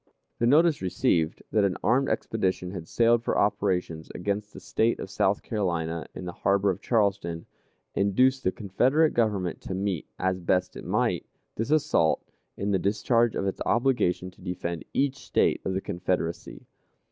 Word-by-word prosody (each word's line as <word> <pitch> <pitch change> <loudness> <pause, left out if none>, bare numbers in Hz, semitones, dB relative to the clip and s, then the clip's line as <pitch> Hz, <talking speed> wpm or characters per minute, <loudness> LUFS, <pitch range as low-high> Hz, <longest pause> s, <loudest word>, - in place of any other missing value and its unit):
The 120 - +2
notice 155 +3 +4
received, 90 -3 0
that 105 -2 +3
an 95 -2 +1
armed 135 +3 +3
expedition 95 -4 -1
had 90 -4 -7
sailed 115 0 +3
for - - 0
operations 95 -6 0
against 100 +3 -2
the - - -10
State 115 +1 0
of 95 - -6
South 100 +1 +1
Carolina 85 -6 -2
in 90 - -6
the 90 - -4
harbor 100 +2 +2
of 90 - -6
Charleston, 100 -7 0 0.5
induced 130 +7 +2
the 95 - +2
Confederate 130 - +2
Government 100 -7 0
to 95 - -5
meet, 95 -4 -2
as 95 0 0
best 90 +1 0
it - - -8
might, - - 0 0.3
this 115 +4 -2
assault, 145 - +2 0.3
in 100 +1 -1
the 95 - +2
discharge 115 +4 +2
of - - -1
its 95 - -3
obligation 115 -8 +1
to 90 - -22
defend 90 -2 -4
each 140 0 0
State - - +1
of 95 - -2
the 95 - -1
Confederacy. 90 -2 -3
100 Hz, 165 wpm, -27 LUFS, 90-115 Hz, 0.5 s, notice